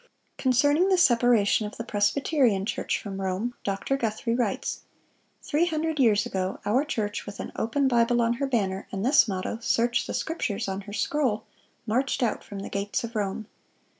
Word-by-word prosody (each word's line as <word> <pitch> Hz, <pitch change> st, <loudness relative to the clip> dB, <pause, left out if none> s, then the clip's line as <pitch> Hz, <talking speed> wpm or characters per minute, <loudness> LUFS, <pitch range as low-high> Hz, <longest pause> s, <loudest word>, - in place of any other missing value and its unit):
(632) -, -, -6 dB
Concerning 290 Hz, +8 st, +3 dB
the 375 Hz, -, +4 dB
separation 235 Hz, -, +4 dB
of 210 Hz, -, -10 dB
the 230 Hz, -, -4 dB
Presbyterian 220 Hz, 0 st, +1 dB
Church 215 Hz, -, -1 dB
from 195 Hz, -2 st, -6 dB
Rome, 190 Hz, +6 st, -2 dB
Dr. 200 Hz, +7 st, -1 dB
Guthrie 230 Hz, -1 st, -1 dB
writes: 235 Hz, -5 st, -1 dB, 0.6 s
"Three 315 Hz, +4 st, +1 dB
hundred 320 Hz, -2 st, -1 dB
years 215 Hz, -5 st, +4 dB
ago, 190 Hz, 0 st, -3 dB
our 245 Hz, +7 st, +2 dB
church, 215 Hz, -10 st, -3 dB
with 200 Hz, -1 st, -8 dB
an -, -, -5 dB
open 275 Hz, +5 st, +1 dB
Bible 240 Hz, -1 st, +3 dB
on 235 Hz, 0 st, +2 dB
her 275 Hz, -, +1 dB
banner, 195 Hz, -7 st, -1 dB
and 195 Hz, +2 st, -3 dB
this 275 Hz, -1 st, +5 dB
motto, 195 Hz, +3 st, -3 dB
'Search 235 Hz, 0 st, +1 dB
the -, -, -3 dB
Scriptures,' 290 Hz, -13 st, -2 dB
on 195 Hz, 0 st, -3 dB
her -, -, -8 dB
scroll, 230 Hz, 0 st, 0 dB, 0.4 s
marched 255 Hz, +4 st, 0 dB
out 235 Hz, -, -1 dB
from 200 Hz, -1 st, -8 dB
the -, -, -6 dB
gates 200 Hz, +3 st, -2 dB
of 230 Hz, 0 st, -6 dB
Rome." 205 Hz, +1 st, -2 dB
230 Hz, 180 wpm, -26 LUFS, 205-265 Hz, 0.6 s, this